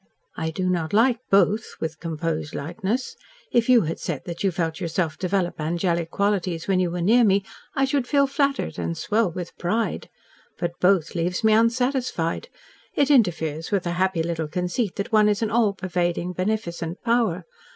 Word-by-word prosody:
"I 160 Hz, -1 st, -2 dB
do 185 Hz, +3 st, -2 dB
not 170 Hz, -2 st, -1 dB
like 230 Hz, +2 st, +4 dB
'both,'" 205 Hz, +3 st, +2 dB
with 160 Hz, 0 st, -4 dB
composed 160 Hz, -1 st, -3 dB
lightness. 190 Hz, -, -3 dB, 0.4 s
"If 235 Hz, 0 st, +2 dB
you 245 Hz, -2 st, +7 dB
had 165 Hz, -2 st, -3 dB
said 150 Hz, -6 st, -4 dB
that 170 Hz, +1 st, -5 dB
you 195 Hz, -, +3 dB
felt 165 Hz, -2 st, -2 dB
yourself 170 Hz, -2 st, -1 dB
develop 185 Hz, -3 st, -1 dB
angelic 170 Hz, +1 st, 0 dB
qualities 185 Hz, -4 st, -1 dB
when 190 Hz, -2 st, +2 dB
you 180 Hz, -1 st, +1 dB
were 175 Hz, 0 st, -3 dB
near 235 Hz, +6 st, +5 dB
me, 200 Hz, -2 st, +3 dB, 0.3 s
I 270 Hz, -, +3 dB
should 270 Hz, -2 st, 0 dB
feel 280 Hz, 0 st, +4 dB
flattered, 275 Hz, 0 st, -1 dB
and 165 Hz, -, -3 dB
swell 210 Hz, +5 st, +1 dB
with 175 Hz, 0 st, -6 dB
pride. 220 Hz, +6 st, -1 dB, 0.5 s
But 175 Hz, -, -1 dB
'both' 180 Hz, -3 st, +3 dB
leaves 180 Hz, +4 st, -1 dB
me 220 Hz, 0 st, +5 dB
unsatisfied. 240 Hz, -, +1 dB, 0.5 s
It 285 Hz, 0 st, +3 dB
interferes 165 Hz, -, +2 dB
with 200 Hz, -3 st, +1 dB
the 175 Hz, -, -2 dB
happy 185 Hz, -1 st, +1 dB
little 165 Hz, -2 st, -2 dB
conceit 180 Hz, +5 st, -2 dB
that 200 Hz, -, -4 dB
one 215 Hz, -1 st, +5 dB
is 210 Hz, +2 st, 0 dB
an 220 Hz, -, -1 dB
all 220 Hz, -3 st, +3 dB
pervading, 180 Hz, -1 st, -1 dB
beneficent 180 Hz, -3 st, -3 dB
power. 235 Hz, 0 st, +1 dB
185 Hz, 175 wpm, -24 LUFS, 170-220 Hz, 0.5 s, you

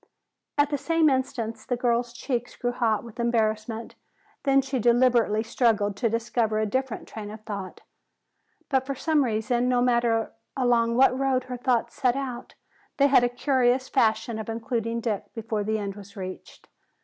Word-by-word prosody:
At 290 Hz, 0 st, +3 dB
the 290 Hz, -, 0 dB
same 330 Hz, -1 st, +3 dB
instant 255 Hz, -4 st, -2 dB
the 245 Hz, -, +1 dB
girl's 240 Hz, 0 st, +1 dB
cheeks 245 Hz, 0 st, -3 dB
grew 245 Hz, -, -1 dB
hot 230 Hz, -3 st, 0 dB
with 235 Hz, 0 st, -12 dB
embarrassment. 225 Hz, -1 st, -1 dB, 0.5 s
Then 275 Hz, -1 st, +5 dB
she 265 Hz, -1 st, -2 dB
deliberately 235 Hz, -2 st, +3 dB
struggled 225 Hz, -3 st, +1 dB
to 230 Hz, 0 st, +1 dB
discover 225 Hz, -1 st, 0 dB
a 215 Hz, -, +1 dB
different 260 Hz, +2 st, -2 dB
train 210 Hz, -2 st, -7 dB
of 215 Hz, +1 st, -9 dB
thought. 200 Hz, -4 st, -7 dB, 0.9 s
But 265 Hz, -1 st, +1 dB
for 275 Hz, -, -2 dB
some 310 Hz, +1 st, +2 dB
reason, 240 Hz, +1 st, 0 dB
no 250 Hz, -1 st, +3 dB
matter 235 Hz, -2 st, +2 dB, 0.3 s
along 235 Hz, -2 st, +2 dB
what 255 Hz, 0 st, +5 dB
road 265 Hz, -1 st, +1 dB
her 250 Hz, -1 st, -6 dB
thoughts 245 Hz, -1 st, 0 dB
set 255 Hz, -3 st, +1 dB
out, 260 Hz, -3 st, -5 dB, 0.4 s
they 280 Hz, -, +5 dB
had 265 Hz, -3 st, +5 dB
a 245 Hz, -, +3 dB
curious 255 Hz, 0 st, +1 dB
fashion 225 Hz, -2 st, +1 dB
of 220 Hz, -, -6 dB
including 230 Hz, 0 st, -2 dB
Dick 220 Hz, -4 st, -3 dB
before 220 Hz, -2 st, -2 dB
the 220 Hz, +1 st, 0 dB
end 200 Hz, -2 st, -4 dB
was 200 Hz, 0 st, -13 dB
reached. 185 Hz, -1 st, -8 dB
235 Hz, 170 wpm, -26 LUFS, 220-255 Hz, 0.9 s, Then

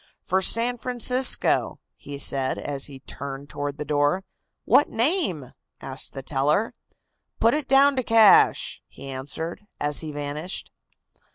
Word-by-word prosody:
"For 190 Hz, +1 st, 0 dB
San 235 Hz, +5 st, +2 dB
Francisco," 250 Hz, +1 st, +1 dB, 0.2 s
he 145 Hz, 0 st, -9 dB
said, 135 Hz, -1 st, +1 dB
as 140 Hz, -2 st, -2 dB
he 135 Hz, -2 st, -11 dB
turned 140 Hz, +1 st, -8 dB
toward 145 Hz, 0 st, -4 dB
the 150 Hz, -, -5 dB
door. 145 Hz, +5 st, +1 dB, 0.4 s
"What 290 Hz, -, +4 dB
name?" 230 Hz, -, -1 dB, 0.3 s
asked 135 Hz, 0 st, -7 dB
the 135 Hz, -, -7 dB
teller. 150 Hz, +11 st, 0 dB, 0.7 s
"Put 230 Hz, +1 st, +4 dB
it 300 Hz, -3 st, -2 dB
down 275 Hz, +1 st, +5 dB
to -, -, +2 dB
'cash,'" 225 Hz, -4 st, +4 dB
he -, -, -12 dB
answered, 145 Hz, +7 st, -5 dB, 0.2 s
as 145 Hz, 0 st, +1 dB
he 155 Hz, -2 st, -6 dB
vanished. 145 Hz, +4 st, -5 dB
150 Hz, 135 wpm, -24 LUFS, 140-230 Hz, 0.7 s, down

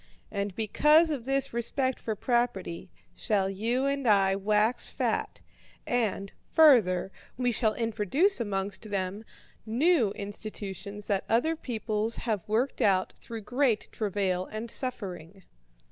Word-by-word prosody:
And 200 Hz, -2 st, -3 dB
because 300 Hz, +9 st, +4 dB
of 265 Hz, -6 st, -3 dB
this 270 Hz, -2 st, 0 dB
respect 260 Hz, +2 st, -1 dB
for 220 Hz, -, -3 dB
property 210 Hz, -7 st, -1 dB, 0.2 s
shall 200 Hz, -4 st, 0 dB
you 230 Hz, +7 st, -1 dB
and 275 Hz, -2 st, -1 dB
I 195 Hz, -2 st, +4 dB
wax 210 Hz, +4 st, +1 dB
fat, -, -, -2 dB, 0.4 s
and, 215 Hz, -5 st, -1 dB, 0.2 s
further, 215 Hz, -, +5 dB, 0.3 s
we 245 Hz, -1 st, +1 dB
shall 220 Hz, -2 st, +1 dB
introduce 230 Hz, -, +1 dB
amongst 200 Hz, -1 st, -3 dB
them 195 Hz, +1 st, -3 dB, 0.4 s
new 250 Hz, -, +2 dB
institutions 205 Hz, 0 st, -6 dB
that 195 Hz, -2 st, 0 dB
other 255 Hz, +9 st, +2 dB
peoples 225 Hz, -5 st, -2 dB
have 215 Hz, -5 st, -3 dB
worked 240 Hz, +5 st, 0 dB
out 190 Hz, -2 st, +2 dB
through 230 Hz, -1 st, -7 dB
great 245 Hz, 0 st, 0 dB
travail 195 Hz, -3 st, -1 dB
and 220 Hz, +2 st, -5 dB
suffering.' 195 Hz, -, -4 dB
215 Hz, 125 wpm, -28 LUFS, 200-245 Hz, 0.4 s, further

